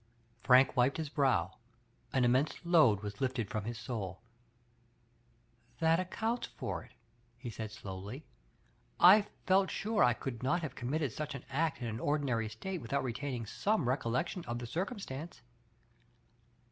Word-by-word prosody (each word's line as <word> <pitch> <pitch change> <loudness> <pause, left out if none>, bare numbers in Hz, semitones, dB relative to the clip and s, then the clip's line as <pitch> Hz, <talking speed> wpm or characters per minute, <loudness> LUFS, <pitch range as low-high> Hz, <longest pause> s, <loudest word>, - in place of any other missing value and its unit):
Frank 130 +1 +5
wiped 125 +2 +3
his 160 -2 -3
brow; 125 - +1 0.5
an 130 -2 +3
immense 130 +5 +2
load 155 - +5
was 105 +3 -6
lifted 125 -5 -1
from 110 -3 -2
his 120 0 -4
souL 110 -5 -5 1.6
"That 165 0 +4
accounts 220 +6 -2
for - - -5
it,*' - - -18 0.4
he 120 -1 -6
said 110 0 -5
slowly, 105 +6 -7 0.7
I 205 +3 +8 0.2
felt 190 0 +4
sure 215 +1 +1
I 120 - +5
could 120 0 -6
not 165 +7 +1
have 140 -4 -4
cona 120 - -4
mitted 150 -5 0
such 150 +4 -4
an 130 - -8
act 155 -1 0
in 115 -2 -3
^n - - -7
ordinary 130 -7 0
state 175 - -5
without 140 +4 -1
retaining 125 -1 -3
some 205 - 0
recollection 130 +7 -1
of 120 0 -3
the 120 - -5
circumstance. 170 - -5
130 Hz, 150 wpm, -33 LUFS, 115-160 Hz, 1.6 s, I